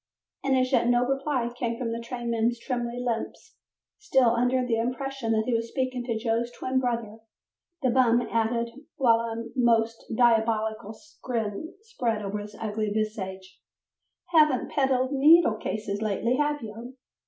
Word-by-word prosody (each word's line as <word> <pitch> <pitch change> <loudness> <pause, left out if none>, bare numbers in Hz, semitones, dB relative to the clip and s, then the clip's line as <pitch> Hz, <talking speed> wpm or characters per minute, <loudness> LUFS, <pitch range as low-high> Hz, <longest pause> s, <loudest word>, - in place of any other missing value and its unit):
As 260 -1 +2
yet 240 -2 +3
no 245 0 +3
reply 270 -2 -1
came 235 -1 -2
from 230 -2 -3
the 230 - -3
trainman's 235 -1 -1
trembling 240 0 -3
lips, 230 -2 -4 0.4
still 265 - +3
under 250 +2 +1
the 230 -2 0
impression 255 0 -2
that 220 0 +1
he 250 - 0
was 230 0 0
speaking 255 0 -2
to 230 -3 -1
Joe's 230 +1 -1
twin 260 +1 -1
brother, 230 -3 -2 0.6
the 255 - +3
bum 240 -2 +4
added, 235 +1 -1 0.2
while 230 -4 +4
a 230 0 -4
most 230 -2 +2
diabolical 220 -2 +1 0.3
grin 230 - -3
spread 235 - -2
over 200 +1 -3
his 210 0 -9
ugly 215 -1 -2
visage, 195 -3 -4 0.7
"Haven't 305 -6 +3
peddled 265 -2 +1
needle 290 -3 +5
cases 210 -1 -4
lately, 220 +4 0
have 295 -2 0
you?" 230 +4 -9
235 Hz, 145 wpm, -26 LUFS, 225-255 Hz, 0.7 s, needle